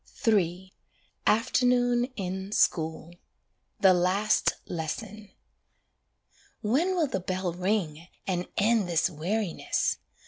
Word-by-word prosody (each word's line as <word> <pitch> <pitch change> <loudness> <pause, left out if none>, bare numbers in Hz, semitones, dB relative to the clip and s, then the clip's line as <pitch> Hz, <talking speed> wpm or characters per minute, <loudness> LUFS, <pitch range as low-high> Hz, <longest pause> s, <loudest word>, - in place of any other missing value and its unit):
III 185 -3 +1 0.5
=Afternoon 245 +1 +3
in 190 0 -4
School= 160 -3 0 0.7
THE 190 -2 +7
LAST 185 +4 +2
LESSON 205 +6 -5 1.3
When 305 - +1
will 340 -3 +2
the 260 -9 -2
bell 185 -1 -2
ring, 180 -3 -2 0.2
and 180 -2 -2
end 210 -2 +2
this 170 +2 +2
weariness? 180 +4 -1
190 Hz, 95 wpm, -28 LUFS, 175-220 Hz, 1.3 s, THE